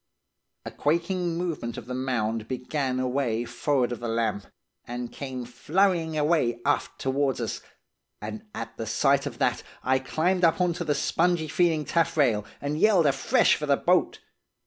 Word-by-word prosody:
"A - - -5
quaking 170 +2 0
movement 165 -9 -3
of 115 - -7
the 125 - -6
mound 115 -4 -1
began 130 +1 -2
away 125 -3 0
forrard 125 +1 0
of 120 - -4
the 120 - -4
lamp, 115 -3 -1 0.4
and 120 0 -6
came 130 -3 -6
flurrying 160 +5 +1
away 150 -6 +2
aft 145 - 0
towards 135 0 0
us, 115 -3 -3 0.6
and 215 -1 -6
at 115 - -6
the 115 - -4
sight 140 +5 +2
of - - -7
that - - +1 0.2
I 130 0 +2
climbed 175 +7 0
up 165 0 +4
on 180 -1 +2
to 175 - -4
the 150 -3 0
spongy 170 0 +1
feeling 160 -1 +1
taffrail, 140 -10 +2 0.2
and 145 +2 -3
yelled 195 -5 +5
afresh 140 - +3
for - - -4
the - - +4
boat. - - +2
140 Hz, 165 wpm, -26 LUFS, 120-165 Hz, 0.6 s, yelled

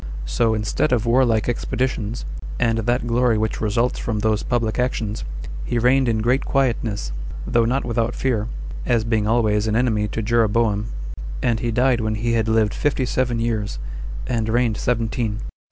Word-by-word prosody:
So, 85 - +1
instead 105 +7 0
of 120 -2 +2
warlike 115 -2 +3
expeditions, 120 -2 -2 0.3
and 115 -1 +2
that 120 +3 0
glory 120 -1 +2
which 110 0 -1
results 115 +3 +1
from 110 -2 -2
those 110 0 +1
public 115 -2 -1
actions, 115 -4 -1 0.4
he 120 - -1
reigned 125 +2 +3
in 110 -1 0
great 125 +4 +2
quietness, 115 - 0 0.3
though 115 -1 +2
not 130 +4 0
without 115 0 0
fear, 115 -5 0 0.4
as 120 -2 +2
being 110 -2 +1
always 110 -2 +2
an 110 - +1
enemy 110 -3 +2
to 110 +1 -3
Jeroboam, 110 -1 +2 0.6
and 115 -2 +2
he 120 - -1
died 120 +1 +2
when 110 -1 -1
he 115 +2 0
had 115 -1 +1
lived 110 -2 +2
fifty 140 -3 0
seven 125 -1 0
years, 110 - -1 0.5
and 110 -2 -1
reigned 115 -1 +2
seventeen. 115 -2 -1
115 Hz, 165 wpm, -22 LUFS, 110-120 Hz, 0.6 s, warlike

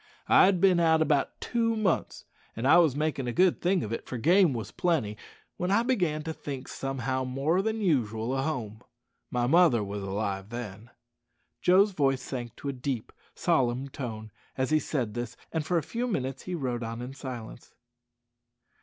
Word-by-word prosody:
"I - - +7
had 190 -1 +3
bin 185 -1 +5
out 160 -1 +4
about 150 -3 +1
two 230 -1 0
months, 210 -6 -1 0.3
an' 115 - -5
was 160 0 +5
makin' 150 -3 -1
a - - 0
good 180 +7 +3
thing 180 -1 +2
of 110 - -4
it, - - -5
for 125 - -4
game 175 - +4
wos 110 -5 -4
plenty, 150 -13 0 0.4
when 180 - -1
I 205 +4 +3
began 180 -12 0
to 160 0 -4
think 140 -4 -7
somehow 130 -1 -2
more 135 +8 0
than 220 +2 -2
usual 120 - 0
o' 135 - 0
home. 120 -8 -3 0.5
My 120 -1 0
mother 140 -5 +4
wos 100 0 -5
alive 100 0 -3
then." 115 -2 -7 0.7
Joe's 195 +3 +5
voice 135 -6 +1
sank 120 -3 -6
to 140 - -5
a - - -2
deep, 125 -2 -4 0.2
solemn 130 +2 +1
tone 110 -6 -6 0.3
as 130 +2 0
he 155 - +4
said 125 -9 -2
this, 120 0 -5
and 160 -2 -1
for 175 +3 0
a 165 - 0
few 235 - -3
minutes 135 - -3
he 185 - -3
rode 125 -6 -2
on 115 +1 -5
in 130 +2 -7
silence. 125 -4 -8
135 Hz, 180 wpm, -28 LUFS, 120-170 Hz, 0.7 s, I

